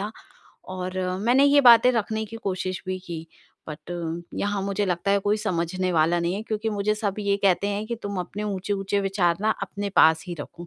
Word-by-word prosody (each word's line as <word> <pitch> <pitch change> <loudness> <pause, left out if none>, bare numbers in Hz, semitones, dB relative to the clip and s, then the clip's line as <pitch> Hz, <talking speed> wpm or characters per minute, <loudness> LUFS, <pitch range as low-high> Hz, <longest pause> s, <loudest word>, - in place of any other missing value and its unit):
था। 205 +2 -3 0.6
और 185 0 -4 0.3
मैंने 260 +3 +5
ये 285 0 +6
बातें 245 -1 +7
रखने 220 -1 -1
की 225 +2 -9
कोशिश 185 -3 -3
भी 185 0 -2
की 165 -1 -6 0.4
बट 150 +2 -9 0.5
यहाँ 205 0 -1
मुझे 200 +1 -1
लगता 180 +2 -1
है 200 - +4
कोई 205 +2 +2
समझने 185 -2 -1
वाला 165 +2 +3
नहीं 170 +2 -1
है 210 - -4
क्योंकि 220 0 -3
मुझे 210 +1 0
सब 205 -2 -2
ये 200 -1 +1
कहते 195 0 +3
हैं 205 +1 -3
कि, 235 - -3
तुम 205 -3 -6
अपने 205 +4 -6
ऊँचे-ऊँचे 200 0 -2
विचार 190 -4 +1
ना 215 - +2
अपने 200 0 -4
पास 160 +1 +5
ही 175 - -3
रखो। 175 +3 -9
200 Hz, 205 wpm, -24 LUFS, 180-210 Hz, 0.6 s, बातें